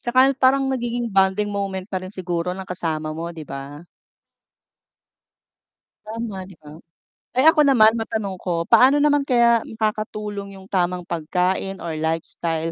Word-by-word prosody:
Tsaka 255 +2 +4
parang 270 +1 +3
nagiging 240 -2 -2
bonding 195 +2 +2
moment 195 -2 -3
na 190 - -1
rin 185 - -7
siguro 180 -3 -3
ng 190 0 -8
kasama 160 -3 -3
mo 170 +1 -5
'di 165 -2 -9
ba? 140 +3 -8 2.2
Tama 220 -2 -5
'di 190 - -14
ba? 150 +1 -12 0.6
Ay 260 - +3
ako 300 -2 +3
naman 220 -5 +6
matanong 210 -4 -3
ko, 170 -2 -2
paano 260 +10 +6
naman 290 -1 +2
kaya 235 -2 +4
makakatulong 210 -2 -4
yung 190 0 -14
tamang 180 -1 0
pagkain 180 +4 -2
or 170 - -4
lifestyle 165 0 -2
195 Hz, 140 wpm, -22 LUFS, 170-230 Hz, 2.2 s, naman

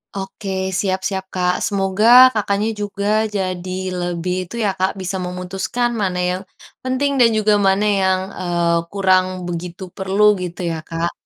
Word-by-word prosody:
Oke, 195 +1 -6 0.3
siap 190 -1 0
siap 190 -1 -4
Kak. 180 -1 0
Semoga 195 +2 +1 0.3
Kakaknya 205 +1 0
juga 205 0 -3 0.3
jadi 185 -1 -3 0.3
lebih 175 0 -2
itu 180 - -10
ya 200 - +2
Kak, 190 +1 +2
bisa 185 0 -3
memutuskan 185 +7 -2
mana 185 -2 -1
yang 180 +1 -2 0.4
penting 260 +2 0
dan 235 - +6
juga 215 0 +3
mana 195 +2 +2
yang, 190 -1 +2 0.2
eee, 170 -1 +1
kurang 185 -2 +3 0.2
begitu 175 +2 -5
perlu, 190 +2 -1 0.2
gitu 180 0 -6
ya 165 - -3
Kak. 165 +1 -2
190 Hz, 150 wpm, -19 LUFS, 180-200 Hz, 0.4 s, dan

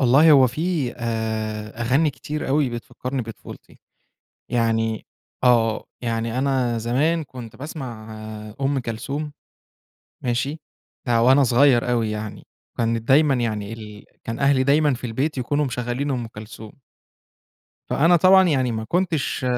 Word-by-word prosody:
والله 135 +5 +6
هو 135 -3 +7
في 150 0 -1
آآ 110 -2 -3
أغاني 140 +6 +2
كتير 150 +3 -5
أوي 140 -1 +2
بتفكّرني 125 +2 -5
بطفولتي. 115 -1 -11 0.7
يعني 115 -2 0 0.4
آه، 115 -3 +3 0.2
يعني 115 0 -2
أنا 130 -3 +1
زمان 145 +9 +1
كنت 125 -5 -10
باسمع 125 -7 -7 0.4
آآ 105 - -15
أُم 135 0 +1
كَلثوم. 140 +6 -4 0.9
ماشي؟ 130 +5 -1 0.5
ده 115 -2 +3
وأنا 130 +4 +6
صغيّر 125 0 +4
أوي 115 -3 +1
يعني، 105 0 -6 0.3
وكانت 115 -1 0
دايمًا 140 +1 +5
يعني 110 -4 -2
ال 105 -2 -10 0.2
كان 115 +1 -4
أهلي 140 -1 +3
دايمًا 145 +1 +3
في 125 0 -6
البيت 135 +6 -2
يكونوا 145 +4 0
مشغّلين 125 +2 -2
أُم 125 -3 -2
كَلثوم. 110 +2 -11 1.1
فأنا 165 +5 +4
طبعًا 185 +2 +6
يعني 130 -6 +1
ما 110 0 -3
كنتش 170 -3 -1
125 Hz, 130 wpm, -22 LUFS, 115-140 Hz, 1.1 s, هو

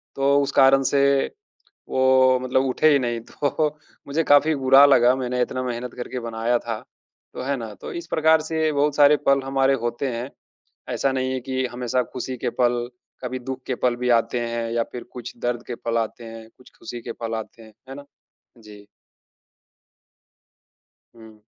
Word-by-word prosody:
तो 140 +1 +3
उस 140 - -3
कारण 135 0 +5
से 140 - +3 0.9
वो 130 0 +4
मतलब 130 +1 +1
उठे 135 +4 +3
ही 140 - +4
नहीं 120 -2 -2
तो 150 +1 0 0.4
मुझे 155 +4 0
काफ़ी 150 +2 +4
बुरा 135 +1 +6
लगा, 125 -2 +5
मैंने 125 -1 -2
इतना 130 +1 -2
मेहनत 125 0 -5
करके 125 +1 -5
बनाया 115 +1 -1
था 115 -2 -5 0.5
तो - - -6
है 140 +2 -1
ना? 115 -3 -7
तो - - -9
इस 170 0 -7
प्रकार 160 -1 +3
से 160 0 -1
बहुत 145 0 +1
सारे 145 0 +6
पल 140 0 +4
हमारे 135 0 +2
होते 120 +4 -2
हैं, 120 +3 -5 0.7
ऐसा 135 -1 0
नहीं 130 0 -1
है 130 - -2
कि 130 +1 -3
हमेशा 125 0 -1
खुशी 130 0 -4
के - - -2
पल, 120 0 +1 0.4
कभी 130 +1 -3
दुःख 130 +1 -6
के 130 - -1
पल 120 -1 0
भी 125 0 -2
आते 120 +2 -4
हैं 115 0 -3
या 120 - +1
फिर 120 - -7
कुछ 125 -1 -8
दर्द 120 -1 -1
के 120 - -4
पल 115 0 -2
आते 115 +1 -4
हैं, 115 0 -10
कुछ 125 - -18
खुशी 120 +1 -8
के 115 - -6
पल 115 -1 -5
आते 110 +1 -8
हैं, 110 -1 -15 0.2
है - - -6
ना? 145 - -10 0.5
जी। 105 -2 -14 2.3
हुँ। 110 -2 -16
130 Hz, 185 wpm, -23 LUFS, 120-135 Hz, 2.3 s, बुरा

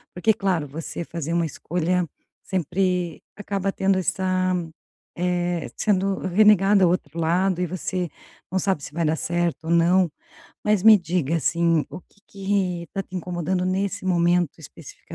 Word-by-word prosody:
Porque, 200 +5 +3
claro, 190 -8 -1
você 160 +4 -6
fazer 165 -1 -4
uma 170 -1 +2
escolha 175 +3 -1 0.4
sempre 180 -1 -1
acaba 200 -1 -2
tendo 195 0 +1
essa, 185 0 0 0.6
eh, 175 -1 -1
sendo 195 -2 +1
renegada 200 +1 +4
ao 175 - +5
outro 170 -3 -2
lado 180 +3 +1
e 180 - 0
você 180 0 -3 0.4
não 190 - 0
sabe 190 -6 0
se 140 - -8
vai 165 +1 0
dar 155 +1 +2
certo 170 -1 -1
ou - - -4
não, 170 +1 +4 0.5
mas 210 -3 +2
me 220 0 +8
diga, 170 -3 -1
assim, 165 -1 +2
o - - -8
que 200 - -30
que 190 -3 -2
tá 195 - -2
te 185 - -9
incomodando 180 +1 -2
nesse 195 +2 -1
momento 175 -3 +2
especif 160 -1 -11
180 Hz, 155 wpm, -23 LUFS, 170-190 Hz, 0.6 s, me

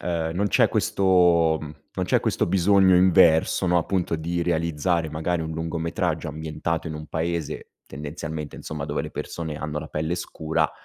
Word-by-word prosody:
e 80 -2 -2
non 100 +3 +1
c'è - - +4
questo, 90 -4 +3
mhmm, 75 -1 -8 0.2
non - - -1
c'è - - +2
questo - - 0
bisogno 95 +1 +4
inverso, 90 -1 +4
no, 90 0 +3
appunto 90 0 -1
di 85 +2 -2
realizzare 85 0 0
magari 80 +2 -1
un 80 - -4
lungometraggio 80 +1 -2
ambientato 80 +2 -3
in 80 - -5
un 75 0 -7
paese, 85 -1 -3 0.2
tendenzialmente 75 +1 -6
insomma 75 -2 -5
dove 75 0 -2
le - - -6
persone 80 -3 -5
hanno 75 -1 -4
la 80 - -7
pelle 80 +3 -2
scura 80 -2 -1
80 Hz, 165 wpm, -24 LUFS, 80-85 Hz, 0.2 s, c'è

